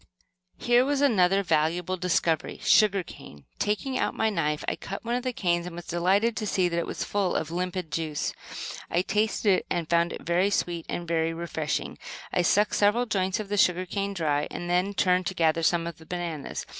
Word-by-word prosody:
Here 240 +1 +4
was 280 +1 0
another 200 -8 +3
valuable 165 +2 +1
discovery 175 -2 0
sugar 200 -3 +4
cane! 75 - -13
Taking 255 +6 -1
out - - 0
my 220 0 +1
knife 150 -5 -1
I - - 0
cut 195 +4 -7
one 235 - -1
of 250 - 0
the 255 0 -2
canes, 175 -6 0
and 175 - -8
was 175 0 -8
delighted 195 +7 +1
to 215 - -2
see 185 -2 +2
that 170 -1 -1
it 170 - -3
was - - -3
full 200 -3 -1
of 160 0 -2
limpid 180 -1 -3
juice. 155 -3 -2 0.6
I 175 +2 +1
tasted 210 -1 +2
it - - -14
and 170 -3 -1
found 170 0 +3
it - - -7
very 175 +3 +2
sweet 175 -4 -1
and 175 - -4
very 165 0 0
refreshing. 160 -2 -3 0.3
I - - +3
sucked 205 +4 +3
several 210 +4 +3
joints 190 -2 0
of 210 -2 -5
the 205 - -1
sugar 185 -1 +3
cane 200 +2 -3
dry, 150 -4 0
and 175 - -6
then 180 +3 +1
turned 180 -2 +2
to 190 - -3
gather 165 -1 +2
some 165 +1 +2
of 170 -1 -6
the 160 - -15
bananas. 170 -5 -4
180 Hz, 205 wpm, -27 LUFS, 170-205 Hz, 0.6 s, Here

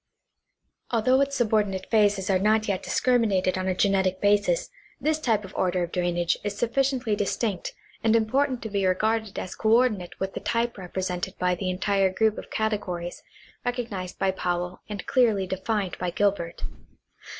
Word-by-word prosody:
Although 255 +3 +3
its 280 0 0
subordinate 210 -6 +1
phases 205 -3 +3
are 185 - +3
not 215 +2 +2
yet 195 -2 0
discriminated 215 -7 +2
on 185 0 -2
a 185 - +1
genetic 190 -1 +2
basis, 205 - +2 0.3
this 310 0 +1
type 220 -8 +1
or 190 - -12
order 180 -1 +1
of 170 - -5
drainage 175 -1 0
is 205 -1 -3
sufficiently 250 -1 +1
distinct 205 -1 -2 0.3
and 225 0 +4
important 255 +3 +1
to 220 - -4
be 200 -1 0
regarded 215 +3 0
as 185 - -4
coordinate 220 -5 +1
with 195 0 -3
the - - -4
type 235 0 0
repre 180 -3 -10
sented 180 +1 -3
by 180 0 +1
the 185 +1 -2
entire 195 +1 +2
group 220 +2 +1
of - - -10
categories 190 -5 -2 0.4
recognized 230 -8 -3
by 195 - +1
Powell 180 -1 -3
and 205 -3 -5
clearly 225 -7 +3
defined 190 +1 -2
by 180 - -1
Gilbei't. 195 -3 -1
205 Hz, 160 wpm, -26 LUFS, 185-225 Hz, 0.4 s, and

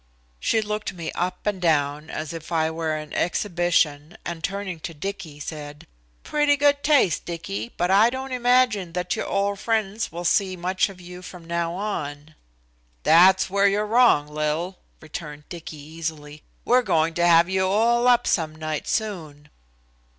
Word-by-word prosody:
She 220 - +1
looked 210 -1 -3
me 170 -3 -5
up 180 +1 -3
and 205 -3 -1
down 150 -2 +1
as 155 +1 -5
if 165 0 -8
I 160 -1 +1
were 160 -1 -2
on 155 0 -8
exhibition 175 -4 0
and 170 -1 -5
turning 195 -2 -3
to 165 +1 -7
Dicky 175 -3 -6
said. 150 -1 -7 0.4
"Pretty 295 -1 +2
good 285 0 +3
taste, 285 - +3
Dicky, 120 - -5
but 175 +2 +1
I 210 +4 +6
don't 260 +1 -5
imagine 245 -7 +2
that 180 0 -1
your - - -3
old 200 0 0
friends 220 -2 -1
will 175 +2 -6
see 185 0 +2
much 185 +3 0
of 190 -2 -12
you 180 0 -10
from 180 -2 -11
now 170 0 -2
on." 155 -6 -4 0.7
"That's 185 +4 +6
where 200 +1 +3
you're 205 +2 +1
wrong, 225 -9 +4
Lil," 155 +5 -2 0.2
returned 150 -1 -8
Dicky 165 -3 -8
easily. 155 0 -7 0.2
"We're 250 +1 +4
going 165 -7 +1
to 175 +1 +2
have 170 0 +6
you 190 0 +1
all 235 +5 +3
up 245 -1 +4
some 155 -3 0
night 155 -1 -4
soon." 160 -9 -3
175 Hz, 165 wpm, -24 LUFS, 155-200 Hz, 0.7 s, I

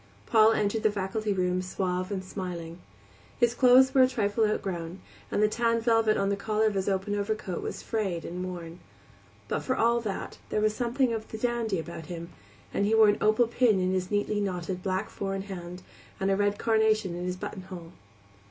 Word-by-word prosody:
Paul 220 -1 +5
entered 210 +1 0
the 215 - +3
faculty 205 +1 -2
room 180 -1 0
suave 185 0 -2
and 190 -2 -3
smiling. 175 -3 -6 0.6
His 240 -2 +3
clothes 255 +1 +6
were 265 - +6
a 255 - +7
trifle 220 -3 +1
outgrown, 180 -4 -3 0.3
and 210 - +1
the - - +6
tan 230 +1 +1
velvet 225 -2 +3
on 195 - +1
the 200 - +1
collar 215 +2 0
of 215 - +2
his 195 0 -1
open 195 +1 -1
overcoat 205 -3 -2
was - - -5
frayed 195 -7 -2
and 180 +1 -5
worn; 175 -2 -7 0.7
but - - -1
for 255 - -1
all 235 -1 +3
that 205 -4 -5
there - - 0
was 215 0 +1
something 245 +1 +1
of 220 -1 -4
the 220 - -7
dandy 230 -3 -1
about 165 0 -7
him, 170 -1 -6 0.4
and 200 - +1
he 220 - +3
wore 220 -1 +7
an 205 - +1
opal 215 +3 +4
pin 230 -3 +2
in 185 0 +1
his 185 -1 -1
neatly 205 0 0
knotted 180 -2 -3
black 185 0 -1
four 195 -1 -3
in 195 - -3
hand, 180 -2 -8 0.4
and 195 0 +1
a - - +3
red 205 +1 +1
carnation 220 -4 +2
in 175 +1 -4
his 180 0 -3
buttonhole. 185 -3 -8
205 Hz, 200 wpm, -28 LUFS, 185-220 Hz, 0.7 s, a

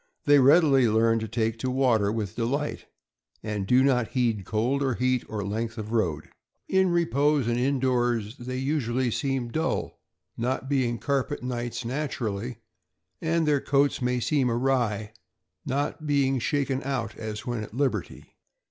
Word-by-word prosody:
They 145 -1 +6
readily 135 -2 +5
learn 115 +1 +3
to 110 - -4
take 115 +1 -1
to 130 - -1
water 120 -6 +2
with 105 -4 -3
delight, 135 +6 -2 0.6
and 105 -3 -3
do 125 +3 +5
not 125 -4 +2
heed 115 -6 0
cold 120 +6 0
or 135 -3 +1
heat 125 0 +1
or 105 -2 -3
length 110 +3 -3
of 110 0 -5
road. 90 -10 -1 0.4
In 190 -1 +3
repose 150 -5 +2
and 120 0 +1
in 135 +2 +1
doors 120 -4 0
they 130 +1 -5
usually 130 -3 0
seem 135 -1 -1
dull, 160 +7 -2 0.4
not 130 +3 -2
being 130 -4 +1
carpet 140 +1 -2
knights 120 -1 -4
naturally; 120 -4 -3 0.6
and 165 -1 +1
their 145 -2 +3
coats 140 0 +2
may 125 0 +1
seem 135 0 +1
awry, 115 -4 0 0.5
not 145 +3 -2
being 135 -2 +2
shaken 135 0 0
out 130 -5 -3
as 110 -1 -6
when 120 -3 -2
at 110 +1 -8
liberty. 140 0 -2
125 Hz, 155 wpm, -26 LUFS, 115-140 Hz, 0.6 s, They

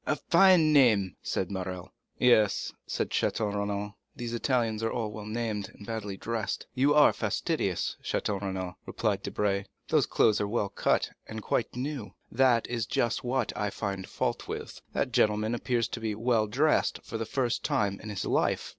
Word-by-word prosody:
"A 155 - +2
fine 170 -2 +5
name," 110 - +4
said 95 0 -2
Morrel. 95 -2 -5 0.2
"Yes," 110 -5 +3
said - - -2
Château 105 -2 0
Renaud, 100 0 -2 0.2
"these 120 -1 -5
Italians 115 -3 0
are 115 - 0
well 110 -3 -4
named 110 -3 -2
and 100 - -11
badly 105 -3 -4
dressed." 115 +1 -3
"You 140 +3 +3
are 150 - +7
fastidious, - - -1
Château 100 -1 -1
Renaud," 95 -2 -4
replied - - -1
Debray; 100 -1 -1 0.2
"those - - +3
clothes 105 - +3
are 105 - 0
well 105 -1 -1
cut 100 - +1 0.2
and 110 -1 -6
quite 115 - -1
new." 130 -3 -4 0.2
"That 120 -2 +3
is 115 -2 -2
just 120 0 0
what 125 -3 -1
I 105 - -1
find 100 -2 -4
fault - - -2
with. - - -6
That - - 0
gentleman 105 +2 +2
appears 120 -1 0
to - - -5
be 110 -2 -2
well 115 -1 +1
dressed 145 +8 +2
for 115 - -5
the 115 - -2
first 125 -4 -1
time 100 -2 0
in 110 - -8
his 100 -2 -3
life." - - +1
110 Hz, 170 wpm, -29 LUFS, 100-120 Hz, 0.2 s, are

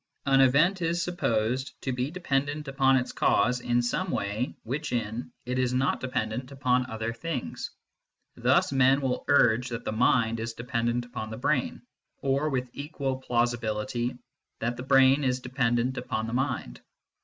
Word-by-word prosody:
An 135 -1 +5
event 155 +9 +4
is 170 +1 0
supposed 130 -6 -1
to 135 - -1
be 125 +2 -1
dependent 145 -3 -2
upon 135 -1 +3
its 125 - -1
cause 125 0 +2
in 120 0 +1
some 185 +10 -1
way 105 -1 -2
which 140 +6 -3
in 120 +1 -3
it 125 +1 -1
is 125 0 +1
not 135 +2 +1
dependent 125 0 -3
upon 130 -2 +1
other 110 +1 -3
things. 130 +3 -4 0.7
Thus - - +3
men 135 +1 +4
will 130 -2 -1
urge 125 -3 +4
that 120 0 -5
the - - -1
mind 115 0 +2
is 115 0 -3
dependent 120 0 -1
upon 120 -3 -6
the 110 - -6
brain, 130 0 -1 0.3
or, 140 +3 0
with 125 -3 -2
equal 140 -2 -3
plausibility, 120 -1 -1 0.4
that 120 +1 -2
the 125 - -7
brain 135 +1 +5
is 130 -1 +1
dependent 125 0 0
upon 110 -3 -3
the 115 - -5
mind. 120 - -2
125 Hz, 160 wpm, -27 LUFS, 120-135 Hz, 0.7 s, An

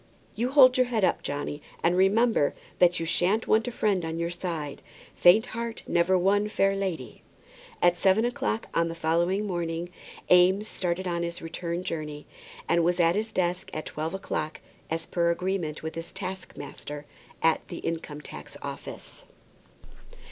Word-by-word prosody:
You 240 +3 -1
hold 260 -2 +7
your 255 -1 +4
head 225 -4 0
up, - - +2
Johnny, 145 +1 -4 0.2
and 170 +1 +3
remember 195 -2 +3 0.2
that 175 -1 +5
you 165 - -2
shan't 185 +6 +1
want 225 +2 +3
a - - -1
friend 205 -6 +1
on 160 0 -3
your 170 0 -1
side. 170 -5 -4 0.3
Faint 205 +6 +6
heart 230 0 -4
never 175 +2 +3
won 200 +3 +3
fair 195 -2 +2
lady." 185 -10 -4 0.6
At 175 0 +4
seven 195 +5 +4
o'clock 235 -2 -1
on 165 0 +2
the 165 - -5
following 170 +5 +1
morning 175 -2 -3 0.4
Eames 185 +4 +5
started 185 -1 -2
on 170 -1 -1
his 170 0 -3
return 170 +1 -4
journey, 150 -3 -5 0.4
and 170 0 +3
was 175 +1 +1
at 170 -1 +5
his 215 +3 -2
desk 180 -1 -1
at 155 - -4
twelve 160 +4 -4
o'clock, 155 -5 -3 0.3
as 165 0 -2
per 170 -1 +1
agreement 170 -3 -2
with 160 - -4
his 165 0 -6
taskmaster 185 -5 -7 0.4
at 165 0 +2
the - - -7
Income 160 -3 -4
tax - - -10
Office. - - -8
175 Hz, 160 wpm, -27 LUFS, 165-195 Hz, 0.6 s, hold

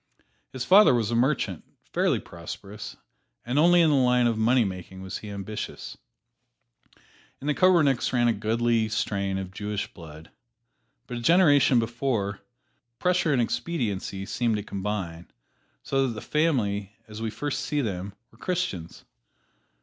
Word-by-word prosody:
His 130 -1 -4
father 195 -6 +7
was 115 -2 0
a - - +1
merchant, 120 - 0 0.3
fairly - - +2
prosperous, 95 +5 -9 0.5
and 125 +4 0
only 175 +2 +6
in 160 -2 +4
the - - +4
line 125 -2 +3
of 115 -1 +2
money 115 +2 +3
making 95 0 -7
was 95 - -5
he 105 - -9
ambitious. 100 +1 -6 1.4
In - - -10
the 150 - +2
Koppernigks 155 -8 +3
ran 120 -1 +2
a 115 - +3
goodly 115 +1 +1
strain 100 -3 -1
of 95 -1 -5
Jewish 105 +1 -4
blood, 80 -2 -12 0.7
but 120 - -6
a - - -5
generation 145 -4 +5
before, 115 -3 -1 0.6
pressure 180 -1 +1
and 125 -4 +3
expediency 105 - -3
seemed 115 +1 0
to 105 - -3
combine, 95 -5 -4 0.5
so 135 -1 +1
that 120 - -3
the 110 - -7
family, 105 - 0
as 110 0 -9
we 115 - -1
first 135 +6 -3
see 150 -1 -1
them, 100 -4 -4 0.2
were - - -22
Christians. 170 - -3
115 Hz, 150 wpm, -26 LUFS, 100-135 Hz, 1.4 s, father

